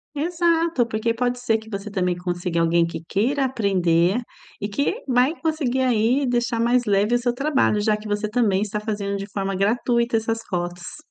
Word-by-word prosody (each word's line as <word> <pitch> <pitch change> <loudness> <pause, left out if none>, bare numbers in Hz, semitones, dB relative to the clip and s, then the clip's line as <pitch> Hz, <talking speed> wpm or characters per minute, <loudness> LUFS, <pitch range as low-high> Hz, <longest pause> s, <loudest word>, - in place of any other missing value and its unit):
Exato. 330 -3 +1
Porque 220 +1 -1
pode 245 +1 -1
ser 230 -2 +1
que 220 0 -12
você 200 0 -5
também 180 -3 0
consiga 175 -1 -2
alguém 170 0 +3
que 165 -1 -6
queira 265 +7 +1
aprender 190 -5 +2 0.4
e 205 - -2
que 280 - -2
vai 255 +4 +3
conseguir 295 -6 0
aí 250 +2 +2
deixar 240 -1 0
mais 240 +1 +2
leve 205 +3 +2
o - - +5
seu 245 0 0
trabalho, 270 -5 +1
já 210 0 +2
que 210 0 -8
você 210 +1 -1
também 210 -4 +1
está 210 0 -2
fazendo 205 -2 -3
de 200 0 -6
forma 195 -1 -2
gratuita 235 +3 +1
essas 225 0 -1
fotos. 175 - -4
220 Hz, 185 wpm, -23 LUFS, 195-250 Hz, 0.4 s, o